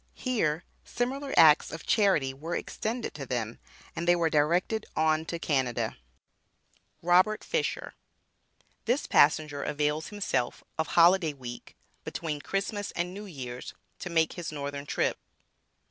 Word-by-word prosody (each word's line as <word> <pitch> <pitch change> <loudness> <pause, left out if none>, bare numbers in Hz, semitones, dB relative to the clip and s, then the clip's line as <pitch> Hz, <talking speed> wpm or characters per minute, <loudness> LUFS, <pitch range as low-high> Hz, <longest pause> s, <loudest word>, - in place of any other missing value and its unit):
Here 175 - 0 0.2
similar 270 +3 -3
acts 155 -2 +7
of 160 - -7
charity 190 -11 +3
were 160 +6 -5
extended 230 +2 -3
to 145 -2 -6
them, 115 -3 -3 0.4
and 170 - -3
they 175 - +6
were 165 -2 +1
directed 175 +8 +1
on 155 0 +2
to 170 - -3
Canada. 130 -7 0 1.1
ROBERT 185 +5 +4
FISHER. 475 -2 -2 0.9
THIS 245 +6 +1
PASSENGER 145 -1 +3
AVAILS 150 +1 -1
HIMSELF 135 -12 -2 0.2
OF 160 - +1
HOLIDAY 170 -2 +5
WEEK, 120 -3 -9 0.3
BETWEEN 155 -3 -4
CHRISTMAS 205 +3 -2
AND 175 +1 -2
NEW 205 +2 -8
YEAR'S, 130 -7 -7 0.2
TO - - -5
MAKE 165 -2 +2
HIS 175 -3 -5
NORTHERN 140 -1 -5
TRIP. - - 0
160 Hz, 130 wpm, -29 LUFS, 145-195 Hz, 1.1 s, acts